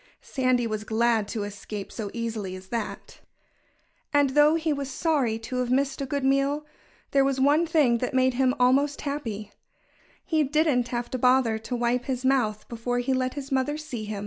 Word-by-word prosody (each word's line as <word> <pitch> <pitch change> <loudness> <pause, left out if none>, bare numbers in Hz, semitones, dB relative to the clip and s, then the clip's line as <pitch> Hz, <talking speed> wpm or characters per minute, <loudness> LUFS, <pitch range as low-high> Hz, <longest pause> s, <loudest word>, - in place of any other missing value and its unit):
Sandy 255 -2 +1
was 215 -1 -3
glad 225 -1 +1
to 215 -1 -3
escape 205 0 -7
so 215 -3 -5
easily 225 -5 -4
as 185 0 -12
that. 230 -3 -5 0.9
And 285 -2 +3
though 295 +3 +5
he 320 -1 0
was 280 -1 -4
sorry 270 -6 0
to 225 +3 -5
have 250 -1 -1
missed 275 +2 0
a 275 - -3
good 280 +1 -2
meal, 275 +2 +1 0.5
there 275 -1 +4
was 270 -1 0
one 295 +5 +3
thing 290 -8 +3
that 250 - -2
made 260 0 +3
him 260 +1 +2
almost 275 +3 +3
happy: 225 -8 -4 0.7
He 315 -2 +1
didn't 290 -4 +2
have 240 0 -4
to 255 - -2
bother 250 -3 +3
to 235 +3 -4
wipe 240 +1 0
his 260 -1 -3
mouth 220 -6 +1
before 240 +1 -3
he 245 +2 0
let 255 0 -1
his 280 -1 -6
mother 270 +3 0
see 265 -8 -6
him. 210 -1 -4
255 Hz, 190 wpm, -26 LUFS, 230-280 Hz, 0.9 s, though